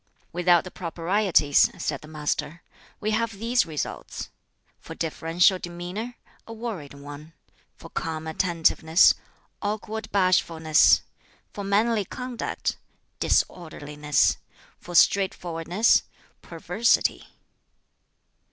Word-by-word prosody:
"Without 175 0 +4
the 185 - -9
Proprieties," 170 -3 +2
said 140 -3 -3
the 155 - -12
Master, 155 +1 -3 0.4
"we 215 0 -1
have 225 +1 0
these 235 +1 +1
results: 155 -2 -5 0.5
for - - -10
deferential 165 +3 +2
demeanor, 180 +8 -6 0.3
a 225 - -7
worried 215 - -6
one; 145 +3 -11 0.4
for - - -12
calm 160 -1 -4
attentiveness, 165 0 +3 0.5
awkward 215 +1 -4
bashfulness; 160 - +4 0.5
for 205 - -6
manly 210 +2 +2
conduct, 250 +3 -4 0.4
disorderliness; 150 -4 0 0.4
for 175 - -9
straightforwardness, 180 +1 +3 0.4
perversity. 180 +7 0
175 Hz, 90 wpm, -25 LUFS, 160-205 Hz, 0.5 s, Without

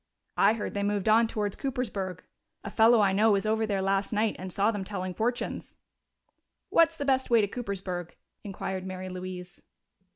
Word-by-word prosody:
"I 200 +2 +6
heard 225 - -4
they 200 - -2
moved 205 -1 -1
on 225 +2 +5
towards 210 -3 -2
Coopersburg. 205 - -3 0.4
A 215 - -6
fellow 225 +1 +5
I 195 -2 +3
know 215 +3 +4
was 195 0 0
over 220 +1 +1
there 195 -2 -1
last 195 0 0
night 215 0 +1
and 185 0 -6
saw 200 +5 +2
them 205 -3 -4
telling 185 -2 -4
fortunes." 240 +5 -3 0.9
"What's 330 0 +4
the 285 - -3
best 265 -1 +1
way 235 -1 +5
to 205 - +2
Coopersburg?" 190 -6 -5 0.3
inquired 190 -2 -4
Mary 185 0 -6
Louise. 180 0 -7
205 Hz, 175 wpm, -28 LUFS, 190-225 Hz, 0.9 s, I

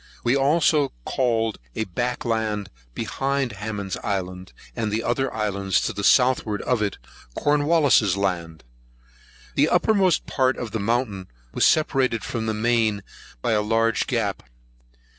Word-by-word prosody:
We 120 +3 +2
also 145 +1 +2
called 115 -4 0 0.2
a - - 0
back 120 +7 -3
land 110 -3 -1 0.2
behind 135 +2 -1
Hammond's 105 -2 -5
Island, 90 -2 -4 0.2
and 110 -3 -2
the 110 +2 -1
other 135 +3 0
islands 100 -3 0
to - - -2
the 100 - -5
southward 125 -4 +3
of 125 -3 0
it, 105 -1 -1 0.4
Cornwallis's 145 - +3
Land. 85 -5 -2 0.9
The - - +3
uppermost 195 -5 +2
part 130 -1 +1
of 115 -3 -5
the 110 - -2
mountain 105 -3 -1 0.3
was - - +4
separated 135 -7 +2
from 110 -1 -3
the 110 - -1
main 110 -2 +1 0.4
by - - +1
a 105 -1 +2
large 115 +1 +1
gap. - - -1
115 Hz, 140 wpm, -23 LUFS, 105-130 Hz, 0.9 s, was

